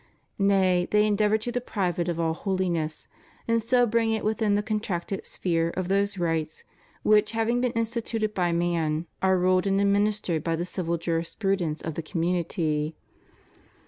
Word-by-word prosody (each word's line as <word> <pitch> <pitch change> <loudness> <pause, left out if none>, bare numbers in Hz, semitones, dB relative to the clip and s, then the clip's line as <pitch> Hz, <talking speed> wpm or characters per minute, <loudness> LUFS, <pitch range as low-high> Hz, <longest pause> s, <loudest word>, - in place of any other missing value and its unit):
Nay, 190 -3 +3
they 210 0 +4
endeavor 210 0 +2
to 220 +3 -4
deprive 200 -8 -2
it 170 - 0
of 170 -1 -2
all 165 -1 +1
holiness, 175 -4 -2 0.4
and 230 0 +2
so 245 +2 +3
bring 230 0 +1
it 220 -1 -1
within 215 -1 +1
the 205 - 0
contracted 205 -4 -3
sphere 165 -2 0
of 185 -1 -2
those 200 +1 +1
rights 165 -3 -2 0.4
which, 215 +1 +4
having 225 +2 +1
been 250 -1 +1
instituted 225 -1 -1
by 175 -3 +1
man, 170 -2 0 0.2
are 190 0 +3
ruled 185 +1 +2
and 195 0 +2
administered 200 -5 +1
by 165 -1 0
the 170 +2 -2
civil 175 -2 -2
jurisprudence 170 0 -1
of 160 - -3
the 165 - -4
community. 165 -2 -1
190 Hz, 160 wpm, -26 LUFS, 170-215 Hz, 0.4 s, they